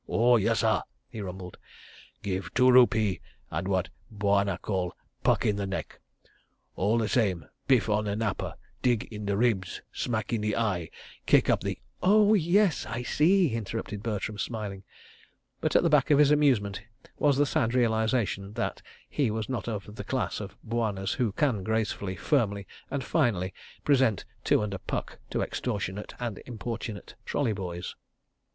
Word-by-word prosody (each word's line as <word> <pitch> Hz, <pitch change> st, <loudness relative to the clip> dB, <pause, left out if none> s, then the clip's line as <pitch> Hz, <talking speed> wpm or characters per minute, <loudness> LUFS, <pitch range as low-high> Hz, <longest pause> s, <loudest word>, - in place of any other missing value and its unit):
"Oh, 120 Hz, +2 st, +4 dB
yessah!" 110 Hz, +1 st, +2 dB, 0.3 s
he 110 Hz, -3 st, -6 dB
rumbled. 90 Hz, -1 st, -7 dB, 0.6 s
"Give 95 Hz, -2 st, -3 dB
two 125 Hz, 0 st, +6 dB
rupee 110 Hz, -6 st, +5 dB, 0.3 s
and 85 Hz, +4 st, -2 dB
what 95 Hz, -1 st, 0 dB, 0.2 s
Bwana 100 Hz, -3 st, +1 dB
call 95 Hz, -3 st, -2 dB, 0.3 s
'puck -, -, +3 dB
in 105 Hz, -, +2 dB
the 100 Hz, -1 st, -2 dB
neck.' 95 Hz, -, -5 dB, 0.8 s
All 105 Hz, +5 st, +2 dB
the 115 Hz, -2 st, +1 dB
same, 95 Hz, -, +1 dB, 0.2 s
biff 130 Hz, -6 st, +4 dB
on 105 Hz, 0 st, +1 dB
the 100 Hz, -1 st, -1 dB
napper, 110 Hz, -2 st, -2 dB, 0.3 s
dig 120 Hz, -4 st, +2 dB
in 105 Hz, -1 st, -5 dB
the 100 Hz, -1 st, +1 dB
ribs, 105 Hz, -6 st, 0 dB
smack 115 Hz, -1 st, -2 dB
in 110 Hz, -, 0 dB
the 105 Hz, 0 st, 0 dB
eye, 95 Hz, -8 st, 0 dB, 0.4 s
kick -, -, +5 dB
up -, -, +2 dB
the—" -, -, -2 dB, 0.2 s
"Oh, 210 Hz, +2 st, +5 dB
yes, 190 Hz, -2 st, +3 dB
I 120 Hz, +3 st, -3 dB
see," 170 Hz, -, +3 dB
interrupted 115 Hz, -2 st, -4 dB
Bertram, 105 Hz, -1 st, -3 dB
smiling—but 100 Hz, -4 st, -6 dB
at -, -, +6 dB
the -, -, +4 dB
back 150 Hz, -1 st, +4 dB
of 145 Hz, -, +6 dB
his 145 Hz, 0 st, +6 dB
amusement 125 Hz, -10 st, +3 dB, 0.4 s
was 145 Hz, -2 st, +3 dB
the 145 Hz, -, +4 dB
sad 115 Hz, -3 st, 0 dB
realisation 110 Hz, -4 st, +1 dB
that 120 Hz, +1 st, -2 dB, 0.3 s
he 140 Hz, -6 st, 0 dB
was 110 Hz, +1 st, -3 dB
not 130 Hz, -3 st, -3 dB
of 105 Hz, -1 st, -5 dB
the -, -, -4 dB
class 130 Hz, -2 st, -2 dB
of 100 Hz, -1 st, -8 dB
bwanas 110 Hz, -4 st, -1 dB
who 120 Hz, -5 st, 0 dB
can 120 Hz, -2 st, +1 dB
gracefully, 105 Hz, -3 st, -1 dB
firmly 100 Hz, -, +1 dB, 0.2 s
and 135 Hz, -1 st, -2 dB
finally 100 Hz, -, +1 dB, 0.3 s
present 130 Hz, -8 st, +3 dB, 0.2 s
two -, -, +3 dB
and 105 Hz, -1 st, -3 dB
a 95 Hz, -, -4 dB
puck -, -, -4 dB
to -, -, 0 dB
extortionate 105 Hz, -4 st, -3 dB
and 120 Hz, -5 st, -3 dB
importunate 115 Hz, -2 st, -5 dB
trolley 120 Hz, -6 st, 0 dB
boys. 90 Hz, -3 st, -5 dB
110 Hz, 160 wpm, -28 LUFS, 100-125 Hz, 0.8 s, two